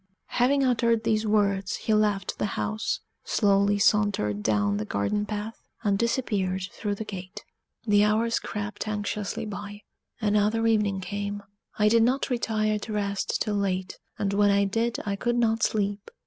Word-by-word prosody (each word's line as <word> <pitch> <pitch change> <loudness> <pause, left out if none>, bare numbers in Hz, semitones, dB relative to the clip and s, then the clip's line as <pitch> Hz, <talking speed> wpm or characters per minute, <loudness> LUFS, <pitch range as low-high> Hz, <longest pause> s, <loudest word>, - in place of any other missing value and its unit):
Having 275 +3 +4
uttered 235 -3 +2
these 220 -1 +1
words, 200 -2 +1
he 220 - -1
left 210 -3 +1
the - - +1
house, 215 +1 -2 0.2
slowly 200 -1 +2
sauntered 200 - +2
down 100 -1 +1
the 105 - -2
garden 105 - -1
path, 210 +1 -5 0.2
and 205 -3 +2
disappeared 205 -6 0
through 205 -2 -3
the 220 - -6
gate. 185 -3 -8 0.4
The 205 -2 +4
hours 220 +2 +2
crept 210 0 -5
anxiously 210 -1 -3
by: 205 0 -7 0.4
another 210 +1 +2
evening 210 -4 +2
came. 205 +1 -4 0.3
I 210 - +4
did 230 +2 +5
not 255 +4 +1
retire 215 -3 0
to 215 +1 -6
rest 200 -1 -1
till 210 - -2
late, 190 -2 -2 0.2
and 200 -1 -1
when 205 0 +4
I 200 0 +3
did 225 +4 0
I 200 -1 -1
could 240 +4 -1
not 225 -1 +2
sleep. 205 -1 0
210 Hz, 160 wpm, -26 LUFS, 200-220 Hz, 0.4 s, did